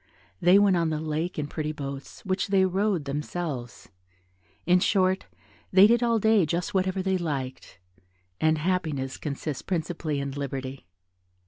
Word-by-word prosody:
They 180 +3 +6
went 200 -2 +5
on 165 -1 +1
the 155 -1 -1
lake 160 +3 -3
in 150 - -1
pretty 155 +1 -3
boats, 140 -2 -7
which 190 +1 0
they 195 -1 +4
rowed 190 -3 0
themselves 145 -3 -4 0.8
in 180 +1 +5
short, 190 0 +2 0.4
they 190 +1 +8
did 235 +2 +4
all 235 -1 +3
day 220 -2 +4
just 170 +2 -2
whatever 190 0 0
they 190 -1 +1
liked, 135 - -4 0.6
and 155 0 +3
happiness 155 -6 -1
consists 145 -1 -4
principally 160 -4 -2
in 140 0 -3
liberty. 135 -5 -5
165 Hz, 145 wpm, -26 LUFS, 145-190 Hz, 0.8 s, they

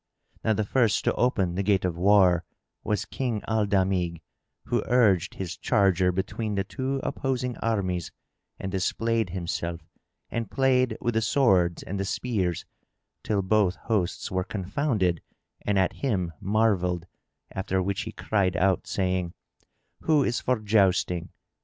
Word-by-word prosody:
Now 110 - +3
the 110 - 0
first 115 -1 +2
to - - +2
open 95 -8 +1
the 95 - -1
gate 100 -1 +2
of 90 -2 -1
war 90 -1 +4 0.4
was 105 - -1
King 120 -5 -3
Al 110 -1 +1
Damigh, 95 -4 +1 0.4
who - - 0
urged 105 -8 +3
his 90 -3 -4
charger 95 -5 +2
between 100 +4 -3
the 100 - +1
two 135 +6 -3
opposing 125 -2 -2
armies 95 -7 -1 0.5
and 95 - -4
displayed 110 +3 0
himself 85 -1 -3 0.5
and 115 -1 -3
played 130 -3 +2
with 120 - 0
the 110 - +2
swords 95 - +2
and 100 +1 -4
the 95 - -1
spears, 95 -5 -1 0.6
till 100 -3 0
both 95 -2 +2
hosts 105 -6 -2
were 95 0 0
confounded 100 - -1 0.4
and 105 -1 0
at 95 -1 +2
him 95 -11 -1
marvelled, 95 -4 +1 0.5
after 95 0 -1
which 95 +1 -1
he 110 - -5
cried 95 -5 0
out, 95 0 +2
saying, 90 -2 -1 0.6
"Who 155 -3 +3
is 120 -2 0
for 125 0 +1
jousting? 100 -5 +2
100 Hz, 145 wpm, -26 LUFS, 90-115 Hz, 0.6 s, war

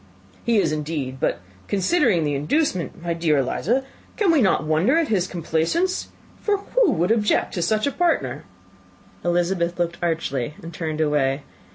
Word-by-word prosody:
"He 235 -1 +2
is, 165 -6 +2
indeed: 150 -4 -3
but - - 0 0.3
considering 200 - +2
the 145 -1 0
inducement, 170 - -1
my 170 -1 -1
dear 165 -2 +1
Miss 135 - +2
Eliza, 240 - 0 0.4
we 360 -6 +4
cannot 210 - +3
wonder 160 - +3
at 330 -3 +1
his 190 -4 +1
complaisance; 175 - -1 0.3
for 415 -1 +1
who 450 +2 +2
would 175 +5 +1
object 215 -2 +2
to 175 - -2
such 215 +4 +1
a 280 - +1
partner?" 345 +2 0 0.8
Elizabeth 175 0 0
looked 170 -1 -2
archly, 150 -6 -1
and 165 +1 -8
turned 160 -1 -3
away. 145 -2 +1
175 Hz, 160 wpm, -23 LUFS, 155-230 Hz, 0.8 s, we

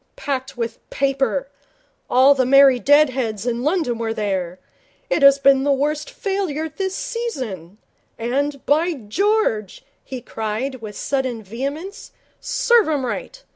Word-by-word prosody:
Packed 270 -2 -4
with 230 -1 -4
paper. 275 - 0 0.6
All 265 +3 +6
the 265 -2 +1
merry 270 0 +6
dead 290 +2 +5
heads 225 -5 -3
in 240 -1 -1
London 295 -5 0
were 225 -1 -2
there. 190 -4 -2 0.5
It - - +2
has 275 0 +7
been 275 -1 +4
the 285 - +2
worst 295 +2 -1
failure 385 - -2
this 380 +5 -4
season. 265 - -5 0.4
And, 275 +4 -2
by 325 +4 +2
George,' 265 - -1 0.2
he 260 - -7
cried, 225 +3 -4
with 210 -2 -8
sudden 260 -5 -2
vehemence, 280 - -6 0.3
'serve 470 -7 +2
'em 285 -4 0
right. - - -5
275 Hz, 135 wpm, -21 LUFS, 235-310 Hz, 0.6 s, has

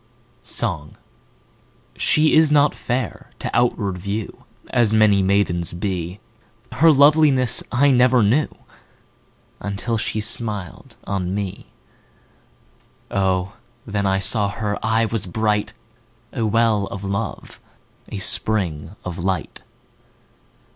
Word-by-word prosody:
Song 80 -10 -4 1.0
SHE 155 0 +3
is 155 -1 +5
not 145 0 +4
fair 120 -3 -4
to - - -5
outward 105 -6 0
view 100 +3 -5 0.3
As 115 -3 +2
many 105 -2 +4
maidens 95 -3 +1
be, 90 0 -4 0.5
Her 165 0 +5
loveliness 145 -3 +4
I 140 +3 +4
never 125 -1 +4
knew 125 +10 +2 1.1
Until 105 +3 -3
she 110 - -2
smiled 105 -5 -3
on 95 -1 -3
me; 100 -2 -5 1.4
O, 95 0 0 0.3
then 100 -2 -1
I 95 0 +2
saw 100 +1 +1
her 105 0 -4
eye 110 +1 +2
was 110 -4 -2
bright, 105 +2 -1 0.6
5 - - -7
A - - +1
well 110 -2 +2
of 100 - -7
love, 100 0 -4 0.5
a - - -5
spring 95 -5 0
of 90 -1 -5
light! 95 +1 -3
105 Hz, 115 wpm, -21 LUFS, 95-115 Hz, 1.4 s, is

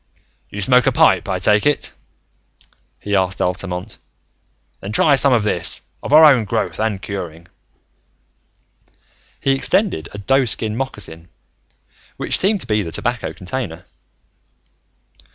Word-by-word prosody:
"You 100 - -6
smoke 125 +3 +3
a - - +4
pipe, - - +3
I 95 - 0
take 105 +7 +3
it?" 145 - -1 1.1
he 100 0 -2
asked 95 -1 0
Altamont. 90 +2 -4 0.8
"Then 100 - -7
try 145 +5 +4
some 140 0 +4
of 120 -4 +3
this, 90 -5 -1 0.2
of - - -6
our 155 +2 +8
own 135 -6 +5
growth 110 +1 -3
and 110 -3 -1
curing." 85 -3 -7 1.9
He 135 - +1
extended 135 - +1
a - - -9
doeskin 115 -1 0
moccasin, 100 -10 -5 0.9
which - - 0
seemed 200 0 +1
to - - -7
be 105 -1 0
the 85 -4 -6
tobacco 120 +5 -2
container. 90 -4 -6
105 Hz, 130 wpm, -19 LUFS, 95-130 Hz, 1.9 s, our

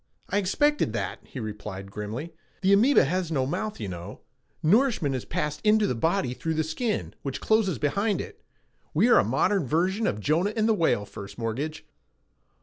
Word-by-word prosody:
"I 205 - +2
expected 295 +10 +1
that," - - -3
he 135 - -9
replied 105 -3 -6
grimly. 110 +11 -5 0.3
"The 195 +1 +4
amoeba 240 - +5
has 175 +3 -1
no 135 -4 +1
mouth, 215 +10 -3
you 105 - -4
know. 90 -2 -7 0.4
Nourishment 205 - +3
is 130 - -3
passed 150 0 -2
into 215 0 +4
the - - 0
body 160 +1 0
through 160 +5 -3
the 160 - +1
skin, 210 +8 -2
which 135 -2 -4
closes 220 -6 +2
behind 200 +7 0
it. - - -8 0.5
We 210 +10 +4
are - - +7
a - - +4
modern 135 - +1
version 185 - +1
of 105 - -1
Jonah 165 - +1
and 220 -1 +2
the 225 - +4
whale, 165 - +1
First 100 0 -10
Mortgage." 125 +7 -3
160 Hz, 180 wpm, -26 LUFS, 125-205 Hz, 0.5 s, are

